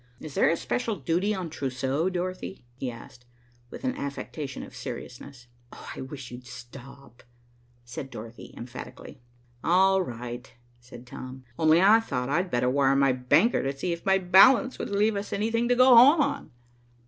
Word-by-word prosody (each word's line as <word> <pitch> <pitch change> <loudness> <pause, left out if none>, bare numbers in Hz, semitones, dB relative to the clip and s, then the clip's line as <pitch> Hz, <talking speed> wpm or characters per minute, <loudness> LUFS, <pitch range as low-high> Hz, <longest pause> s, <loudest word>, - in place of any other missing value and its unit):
Is 155 -3 -9
there - - +3
a 165 - +1
special 230 +3 -2
duty 180 +3 -1
on 180 -4 -5
trousseaux, 135 +4 -2
Dorothy?" 185 -4 -5
he 130 +1 -5
asked, 120 +1 -12 0.5
with - - -10
an 260 0 -1
affectation 140 0 -6
of - - -12
seriousness. 125 +1 -9 0.3
"I - - -9
wish 130 -1 -8
you'd 125 0 -10
stop," 125 +1 -13 0.6
said 125 +2 -7
Dorothy 115 0 -10
emphatically. 120 +2 -10 0.4
"All 190 +2 +4
right," 120 -5 -7 0.3
said 120 0 -13
Tom. 130 +1 -9 0.2
"Only 160 +2 +4
I 215 +3 +7
thought 125 - -3
I'd 175 +6 0
better 125 -4 0
wire 135 +1 +2
my 135 -1 +3
banker 145 - +2
to 135 0 -3
see 175 +5 -2
if 170 - -8
my 195 0 +3
balance 200 +8 +5
would - - -4
leave 205 +2 +1
us 200 +1 -5
anything 230 +3 0
to 245 - +4
go 255 0 +6
home 275 +7 +8
on." 285 -1 -2
140 Hz, 165 wpm, -26 LUFS, 125-195 Hz, 0.6 s, home